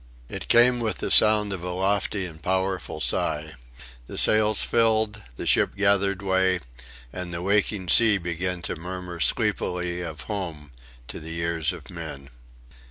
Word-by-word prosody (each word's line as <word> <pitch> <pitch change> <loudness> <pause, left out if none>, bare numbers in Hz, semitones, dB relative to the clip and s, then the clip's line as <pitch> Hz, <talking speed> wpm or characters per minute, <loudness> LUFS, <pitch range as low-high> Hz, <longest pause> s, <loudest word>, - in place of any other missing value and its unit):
It - - -6
came 120 +1 +5
with 110 -2 -2
the - - -3
sound 105 -2 +5
of 90 -3 -6
a 90 - -4
lofty 95 +2 -1
and 80 -3 -10
powerful 95 -1 -2
sigh. 80 0 -2 0.5
The - - -8
sails 110 -1 +5
filled, 110 -2 +1
the - - -6
ship - - +3
gathered 100 -1 +1
way, 95 -1 +2 0.5
and 90 -1 -6
the 85 +1 -4
waking 100 -1 +1
sea 110 0 +6
began 90 0 -3
to - - -3
murmur 90 +1 -7
sleepily 90 -4 -1
of 80 -3 -6
home 85 -9 -6 0.4
to - - -7
the 80 +1 -8
ears 85 -2 -1
of - - -11
men. 70 -1 -8
95 Hz, 155 wpm, -24 LUFS, 85-105 Hz, 0.5 s, sea